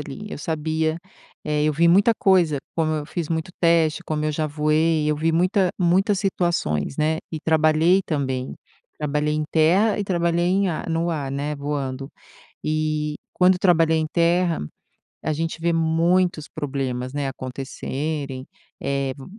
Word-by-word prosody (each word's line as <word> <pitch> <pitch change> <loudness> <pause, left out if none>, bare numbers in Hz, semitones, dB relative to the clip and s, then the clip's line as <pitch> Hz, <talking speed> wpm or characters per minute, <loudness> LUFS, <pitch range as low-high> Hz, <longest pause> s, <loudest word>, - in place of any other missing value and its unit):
ali. 145 +8 -8
Eu - - -6
sabia 160 +1 -1 0.5
eh, 150 0 0
eu 155 - +2
vi 170 +3 +3
muita 200 +6 +5
coisa 180 -8 +3 0.2
como 160 -1 +1
eu 150 -1 -3
fiz 170 -3 -4
muito 160 +1 -2
teste, 165 -2 +3
como 155 -1 -2
eu 155 - 0
já 155 +1 -1
voei, 155 +1 +1
eu 150 - +2
vi 160 +2 +1
muita 180 +3 +2
muitas 190 +3 +2
situações, 170 - -1
né. 155 +1 +1
E 160 - -4
trabalhei 160 +3 +3
também, 130 -4 -2 0.4
trabalhei 150 0 0
em 155 - -1
terra 185 +7 +3
e 205 - -1
trabalhei 170 -2 +1
em 190 +2 +2
ar 165 -1 -4
no 165 +1 0
ar, 145 -5 -3
né, 145 +2 -2
voando. 140 -2 -4 0.6
E, 155 -1 -1 0.2
quando 180 0 +4
trabalhei 165 -4 +3
em 155 0 0
terra, 170 0 +2 0.6
a 155 - 0
gente 165 +1 -3
vê 170 0 +2
muitos 165 0 +1
problemas, 135 -4 -4
né, 145 -1 -2
acontecerem, 135 +1 -5 0.4
eh, 140 -1 -1
v 135 - -10
155 Hz, 160 wpm, -23 LUFS, 150-170 Hz, 0.6 s, muita